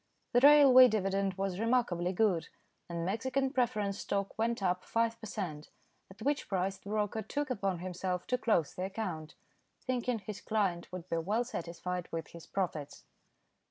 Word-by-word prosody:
The 245 - +5
railway 275 -2 +9
dividend 195 -3 0
was 195 -1 -2
remarkably 220 -7 +1
good, 190 -3 +1 0.4
and 170 -1 -3
Mexican 260 +7 0
Preference 215 -7 0
Stock 200 -1 -2
went 230 -1 -1
up 180 0 +1
five 230 0 0
per 220 - -6
cent., 165 -8 -5 0.4
at 195 +3 -11
which 290 +2 0
price 190 0 -1
the 200 - -11
broker 210 +1 -1
took 285 +6 -3
upon 195 -6 -1
himself 180 0 -3
to 250 - 0
close 195 - +1
the 185 - -3
account, 185 -6 -5 0.4
thinking 250 -1 -1
his 205 -1 -7
client 195 -6 -1
would 180 -1 -7
be 165 - -1
well 205 +8 0
satisfied 180 -5 -4
with 165 0 -4
his 170 -1 -12
profits. 160 -7 -3
195 Hz, 160 wpm, -32 LUFS, 180-230 Hz, 0.4 s, railway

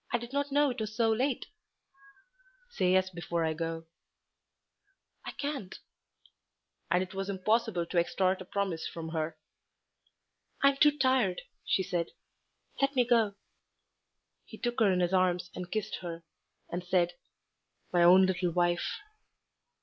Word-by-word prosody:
"I 240 - +3
did 240 +2 -9
not 285 0 -1
know 290 0 +3
it 245 - -6
was 215 0 -4
so 225 -1 +3
late." 255 +3 0 1.3
"Say 185 - +2
yes 185 0 +2
before 170 -1 -2
I 160 - 0
go." 165 0 -4 1.4
"I - - -6
can't." 280 -10 -4 1.1
And 180 +2 +3
it 185 - -10
was 195 +1 -3
impossible 200 -1 +1
to 175 +1 +1
extort 185 +2 +1
a - - -7
promise 190 -4 -2
from 165 -1 -6
her. 160 0 -3 1.3
"I'm 275 0 +5
too 295 +1 +5
tired," 260 -9 +2 0.2
she 190 - +1
said, 170 -2 -1 0.7
"let 275 0 +2
me 250 -2 +4
go." 225 -4 +3 1.1
He - - -11
took 240 0 -2
her 210 -3 +5
in 180 -1 +1
his 175 +1 +1
arms 180 -1 +2
and 180 -1 -6
kissed 215 -2 -2
her, 170 -2 -7 0.5
and 175 +1 -3
said, 175 -1 +1 0.8
"My 175 - +4
own 185 +2 +8
little 185 -1 0
wife." 175 0 0
185 Hz, 145 wpm, -30 LUFS, 175-230 Hz, 1.4 s, own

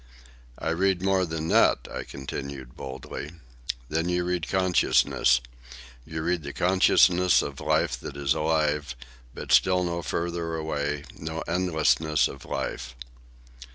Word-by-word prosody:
"I - - -3
read 95 +2 +1
more 95 -2 +2
than 80 0 -3
that," - - +4
I - - -4
continued 70 -1 -7
boldly. 65 +3 -7 0.5
"Then 80 +4 -1
you 90 0 +1
read 90 -2 -2
consciousness. 95 -8 +3 0.7
You 80 0 -4
read 85 0 0
the 70 -1 -7
consciousness 90 -1 +4
of 70 -1 -6
life - - +1
that 70 - -8
it 70 - -6
is 70 - +3
alive; 75 -4 0 0.4
but - - -6
still 90 -1 +4
no 85 -1 -2
further 85 -1 -3
away, 75 -2 -2 0.2
no 80 +1 -4
endlessness 80 -5 +2
of 70 - -10
life." - - -4
80 Hz, 135 wpm, -26 LUFS, 70-90 Hz, 0.7 s, that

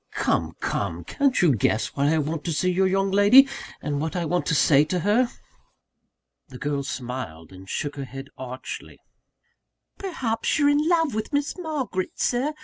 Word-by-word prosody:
"Come! - - 0
come! - - -2
Can't 280 -3 +1
you 160 -5 +5
guess 110 +1 +1
why 140 +1 +2
I 160 - +2
want 155 0 -2
to 170 - -1
see 180 +4 +1
your 190 +1 +2
young 195 +1 +1
lady, 205 +8 +7 0.4
and 145 -1 -2
what 160 +2 -3
I 175 -2 -1
want 175 +3 -1
to 165 - +2
say 145 0 +5
to 180 +3 -1
her?" 225 +6 +3 1.2
The - - -10
girl 145 -2 -2
smiled, 125 - -6
and 95 +1 -13
shook 145 0 -3
her 140 - -4
head 135 +1 -9
archly. 130 0 -7 1.0
"Perhaps 260 - -1
you're 290 -2 +4
in 295 +3 +2
love 325 -5 +2
with 215 0 -3
Miss 285 0 -1
Margaret, 290 - -3
Sir! 265 +5 0
180 Hz, 175 wpm, -24 LUFS, -, 1.2 s, lady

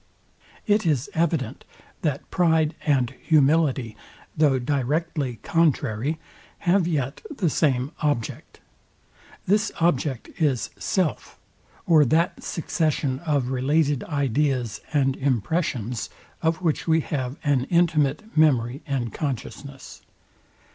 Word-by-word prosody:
It 210 +1 +3
is 150 -6 0
evident, 155 -7 -1 0.4
that 145 -4 -2
pride 160 -3 +2
and 130 -4 +2
humility, 145 -6 +2 0.4
though 150 -4 +3
directly 140 +1 -1
contrary, 150 -4 +1 0.5
have 180 0 +3
yet 140 -5 -2
the 200 - -1
same 135 -2 +1
OBJECT. 145 -7 -2 0.8
This 210 +3 +2
object 145 -6 0
is 140 -6 +1
self, 185 -5 -1 0.5
or 160 -4 +6
that 160 +6 +1
succession 155 -6 -1
of 140 -5 +1
related 140 +2 +1
ideas 135 -6 0
and 135 -3 +2
impressions, 125 - -1 0.3
of 165 +2 0
which 160 -1 0
we 160 0 +4
have 135 -2 -3
an 140 -3 +2
intimate 160 -3 +2
memory 135 -4 +3
and 125 -6 -2
consciousness. 140 0 -6
145 Hz, 105 wpm, -24 LUFS, 130-160 Hz, 0.8 s, or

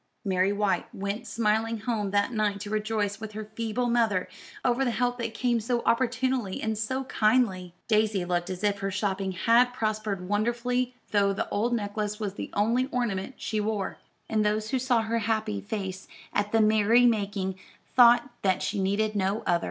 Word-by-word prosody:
Mary 190 0 +2
White 205 -1 0
went 200 +5 -4
smiling 225 0 0
home 215 -3 -1
that 205 +4 +1
night 210 -2 0
to 205 0 -6
rejoice 215 -1 -1
with 220 -1 -7
her 215 0 -5
feeble 230 +2 -1
mother 225 -6 +2 0.4
over 250 +1 +2
the 255 - +1
help 245 +2 0
that 230 -1 -3
came 240 +1 +1
so 235 +2 -1
opportunely 250 -3 +1
and 220 0 -1
so 260 +5 -2
kindly. 215 -8 +1
Daisy 215 -4 +2
looked 175 -1 -1
as 185 0 -5
if 205 -1 +1
her 195 0 -2
shopping 195 -1 -1
had 235 +6 +4
prospered 215 -5 -2
wonderfully 240 +4 0 0.2
though 200 -1 +3
the - - -2
old 235 +4 0
necklace 210 0 -3
was 205 -3 -3
the - - -6
only 235 +5 +2
ornament 240 -3 -2
she 215 - -2
wore; 210 -2 -2 0.3
and 215 -1 +1
those 215 +2 0
who 265 - +1
saw 245 -3 +2
her 230 +1 0
happy 215 - -1
face 190 - -5 0.3
at 205 0 0
the 225 - +4
merry 220 +3 +5
making 200 -4 0 0.4
thought 240 0 +7
that 190 -2 +1
she 200 - -1
needed 210 +3 0
no 195 +2 0
other. 175 - +3
215 Hz, 180 wpm, -27 LUFS, 200-235 Hz, 0.4 s, thought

